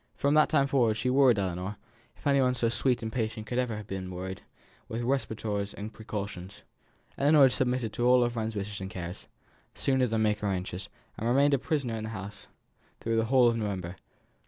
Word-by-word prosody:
From 140 0 +1
that 155 0 +5
time 140 -3 +3
forwards 120 -6 +2
she 125 +4 0
worried 130 -4 +5
Ellinor 95 +1 -2 0.4
(if - - -20
any 140 -1 +4
one 125 -1 +2
so 115 -2 +1
sweet 120 0 0
and 110 - -3
patient 110 -2 -2
could 120 +3 -2
ever 120 -4 -1
have 105 - -7
been 95 -2 -5
worried) 95 +1 -6 0.5
with 115 +1 -3
respirators 110 -6 -2
and 105 +2 -7
precautions. 100 -3 -6 0.6
Ellinor 140 -1 +6
submitted 125 -3 0
to 120 +3 +1
all 125 0 +6
her 120 - +1
friend's 110 -1 -3
wishes 100 0 -4
and 95 - -5
cares, 90 -1 -7 0.5
sooner 130 -2 +2
than 110 -1 0
make 105 -1 +1
her 105 - -2
anxious, 95 -1 -3 0.3
and 115 - -1
remained 140 +3 +4
a 140 - +3
prisoner 135 -5 -1
in 110 - -4
the - - -5
house 105 -1 -8 0.5
through 115 0 -1
the 115 - +2
whole 125 +1 +5
of 115 - +2
November. 95 -5 -3
110 Hz, 205 wpm, -29 LUFS, 100-125 Hz, 0.6 s, Ellinor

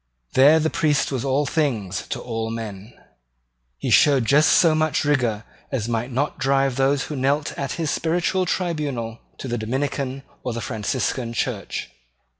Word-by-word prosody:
There 145 +5 +6
the 160 0 0
priest 150 -3 +1
was 130 -3 -2
all 140 +2 +1
things 120 - -1
to - - -3
all 115 -2 -3
men. 110 -2 -6 0.9
He - - -3
showed 140 -5 +5
just 150 +5 +5
so 165 -3 +5
much 155 -1 +1
rigour 120 -7 +1 0.3
as 120 -5 -2
might 120 +2 -2
not 140 +4 -1
drive 135 -1 +2
those 135 +1 +2
who 150 - -5
knelt 140 +3 0
at 140 -2 -3
his 160 -3 -2
spiritual 175 +3 0
tribunal 145 -12 -2 0.2
to - - -6
the 120 -2 -2
Dominican 135 +3 -2 0.2
or 125 - -3
the 115 - -3
Franciscan 120 +1 -2
church. 115 - -3
135 Hz, 160 wpm, -23 LUFS, 115-150 Hz, 0.9 s, There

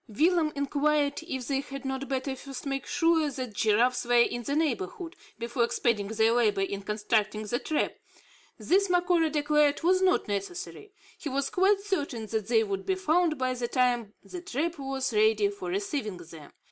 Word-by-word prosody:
Willem 315 - +2
inquired 285 +1 +1
if 260 -6 -4
they 275 -1 0
had 275 0 -7
not 265 +1 -3
better 265 0 -2
first 270 +1 -9
make 275 -1 -3
sure 330 -2 +2
that 255 -4 -6
giraffes 230 +5 +2
were 245 0 +1
in 240 0 +3
the 280 +4 -2
neighbourhood, 310 - -2 0.2
before 235 +1 -1
expending 230 -3 0
their 220 +1 +2
labour 215 -4 +2
in 195 +1 -2
constructing 210 +1 -1
the 240 +3 -1
trap. 310 - -1 0.6
This 395 +2 +2
Macora 355 -2 +3
declared 300 0 +2
was 370 +2 +3
not 375 -1 +2
necessary. 355 - -5 0.3
He 300 - -4
was 275 0 -1
quite 390 +2 +3
certain 290 - -2
that 215 -1 -3
they 225 -1 +3
would 195 -2 -3
be 380 - 0
found 345 -3 +1
by 255 -1 0
the 245 -1 -3
time 245 -4 0
the 360 - -8
trap 330 +1 -3
was 270 -2 -2
ready 215 -1 +3
for 200 -3 -6
receiving 205 +2 -3
them. 165 -3 -12
265 Hz, 175 wpm, -28 LUFS, 220-310 Hz, 0.6 s, in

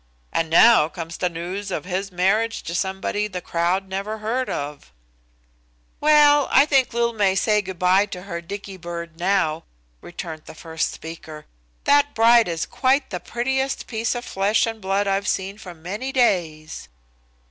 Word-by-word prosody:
And 165 -1 0
now 170 -1 +6
comes 165 +1 -7
the 180 - 0
news 180 +4 -5
of 180 - -4
his 190 +1 -3
marriage 205 +6 +1
to 170 - -5
somebody 190 +3 -1
the 185 -3 -5
crowd 175 +3 -1
never 200 +3 -4
heard 230 +4 -2
of." 145 0 -5 1.1
"Well, 295 -1 +5
I 275 - +6
think 270 -4 +2
Lil 235 0 0
may 200 -3 +2
say 210 +1 +2
good 190 -2 -8
by 185 +3 +3
to 180 -3 -8
her 170 -4 -5
Dicky 195 +2 -8
bird 170 -2 -7
now," 175 -4 +1 0.4
returned 165 -3 -8
the - - -11
first 160 0 -3
speaker. 160 -1 -9 0.4
"That 290 0 +3
bride 230 0 +5
is 165 -2 -2
quite 265 0 +1
the 180 - -3
prettiest 265 +7 -2
piece 225 +1 -2
of 245 0 -5
flesh 200 +3 +1
and 225 -1 -5
blood 195 +1 0
I've 195 +1 0
seen 195 +2 -2
for 185 -5 -10
many 200 +11 -5
days." 170 - 0
195 Hz, 165 wpm, -22 LUFS, 170-225 Hz, 1.1 s, now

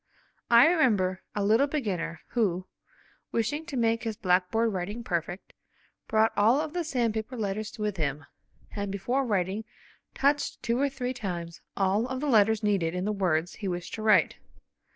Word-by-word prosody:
I 235 +1 +8
remember 215 - +2
a 205 - 0
little 225 +7 +4
beginner 180 - -3
who, 185 -6 0 0.7
wishing 290 +8 -1
to 280 - -4
make 230 -1 +2
his 220 -2 -3
blackboard 190 +5 +1
writing 200 +6 -4
perfect, 175 0 -4 0.5
brought 220 +1 +3
all 225 +7 +4
of 310 0 -3
the 355 -1 -1
sandpaper 240 -4 -2
letters 210 0 -3
with 210 -2 -2
him, 145 -2 -2 0.5
and 200 -1 -3
before 240 +8 -1
writing 200 -2 -1 0.5
touched 285 0 0
two 235 +1 0
or 280 +1 +2
three 255 -2 -3
times 175 -7 -5 0.2
all 200 +4 +2
of 260 0 -4
the 295 - -3
letters 220 -2 +4
needed 185 -5 +1
in 180 +1 -2
the 210 - 0
words 175 -4 0
he 205 - -6
wished 175 -1 -4
to 220 - -4
write. 210 -6 +4
215 Hz, 165 wpm, -28 LUFS, 185-240 Hz, 0.7 s, I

